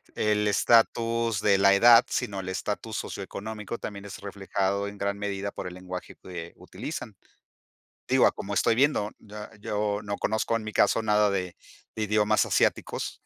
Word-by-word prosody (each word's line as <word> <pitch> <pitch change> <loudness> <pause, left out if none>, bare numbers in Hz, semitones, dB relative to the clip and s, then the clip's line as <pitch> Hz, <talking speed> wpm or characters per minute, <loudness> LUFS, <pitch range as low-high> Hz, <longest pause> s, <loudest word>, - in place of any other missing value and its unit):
el 105 -1 +1
estatus 115 0 +2
de 100 -2 +4
la 100 0 +6
edad, 115 +3 +8
sino 105 -6 -2
el 95 -1 -5
estatus 105 +3 -4
socioeconómico, 105 +3 -6
también 100 -2 -7
es 100 - -8
reflejado 100 0 -2
en 100 0 -8
gran 100 0 -2
medida 100 0 -3
por 95 - -6
el 90 - -8
lenguaje 90 0 -8
que, 85 -2 -8
eh, - - -18
utilizan. - - -7 0.9
Digo, - - +5
a - - +2
como 100 - -6
estoy 105 +3 +3
viendo, 125 -5 +2
ya 105 0 -10
yo 105 0 -2
no 100 0 -4
conozco 110 +1 0
en 115 - -2
mi 110 - -5
caso - - +3
nada 105 -1 +3
de 90 -2 -3 0.4
de 110 - -2
idiomas 105 0 +2
asiáticos - - 0
105 Hz, 170 wpm, -27 LUFS, 100-110 Hz, 0.9 s, edad